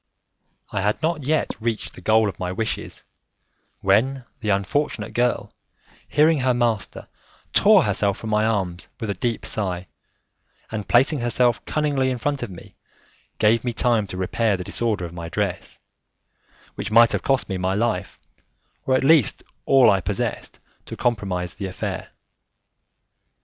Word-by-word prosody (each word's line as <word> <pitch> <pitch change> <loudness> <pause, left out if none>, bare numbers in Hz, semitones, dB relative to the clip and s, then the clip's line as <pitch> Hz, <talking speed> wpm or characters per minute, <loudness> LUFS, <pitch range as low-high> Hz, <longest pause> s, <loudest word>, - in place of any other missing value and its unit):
I 100 - -1
had 105 +2 0
not 160 -4 -1
yet 155 +2 +1
reached 115 -1 -3
the - - -12
goal 110 0 +3
of 95 -4 -5
my 90 -1 -2
wishes, 110 +4 -4 0.8
when 125 +7 +2
the 105 - -3
unfortunate 105 +3 -1
girl, 120 0 0 0.5
hearing 155 0 +3
her 130 -1 +2
master, 115 -4 -1 0.5
tore - - +6
herself 100 -2 0
from 110 - -6
my 105 0 +2
arms 95 -6 -1
with 110 -4 -2
a - - -1
deep 115 +4 -3
sigh, 95 -4 -2 0.9
and 110 -2 -4
placing 135 +5 +4
herself 120 -1 +1
cunningly 145 -4 0
in 130 - -2
front 140 +3 -2
of 120 - -4
me, 90 -3 -12 0.6
gave 110 +1 +3
me 120 -1 -2
time 115 -1 +2
to 95 - -7
repair 100 +3 0
the 90 - -5
disorder 105 -1 -2
of 85 - -9
my 85 -1 -6
dress, 95 0 -3 0.9
which - - -5
might 115 +1 +6
have - - 0
cost 135 -1 +1
me 95 -2 -3
my 95 +1 0
life, 105 -3 -1 0.7
or 130 - +3
at 130 - +1
least 145 -5 +4 0.2
all 135 -3 +6
I 95 -1 +2
possessed - - -3 0.3
to - - -7
compromise 95 -7 -1
the 100 - -5
affair. 90 - -5
110 Hz, 155 wpm, -23 LUFS, 95-125 Hz, 0.9 s, tore